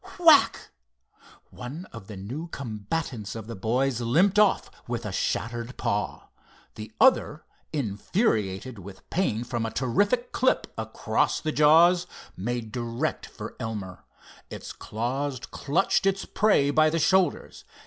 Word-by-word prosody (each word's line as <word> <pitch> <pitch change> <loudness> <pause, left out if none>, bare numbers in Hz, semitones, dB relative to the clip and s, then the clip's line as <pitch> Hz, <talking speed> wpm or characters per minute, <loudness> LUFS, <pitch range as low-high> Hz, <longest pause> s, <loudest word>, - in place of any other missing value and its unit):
whack! 325 -5 +5 0.8
One 140 +9 -7
of 115 -4 -10
the 105 - -8
new 130 - -6
combatants 115 - -4
of 110 -2 -6
the 115 +1 -7
boys 120 +5 0
limped 180 - +3
off 210 -2 +3 0.2
with 120 -1 -3
a 105 - -3
shattered 115 +5 -2
paw. 105 +1 -2 0.4
The 110 0 -9
other, 205 - +4 0.3
infuriated 110 - -1
with 95 +1 -12
pain 120 - 0
from 120 -1 -3
a 115 - -1
terrific 200 - 0
clip 260 - +2
across - - 0
the 155 - -2
jaws, 165 +4 +5 0.3
made 115 +2 -3
direct 120 0 -3
for - - -9
Elmer. 100 -5 -5 0.5
Its - - -7
claws 130 +5 -3
clutched 145 +9 0
its 195 0 0
prey 170 -10 +3
by 155 +1 +4
the 165 - -1
shoulders. 185 +3 +1
125 Hz, 130 wpm, -26 LUFS, 110-165 Hz, 0.8 s, whack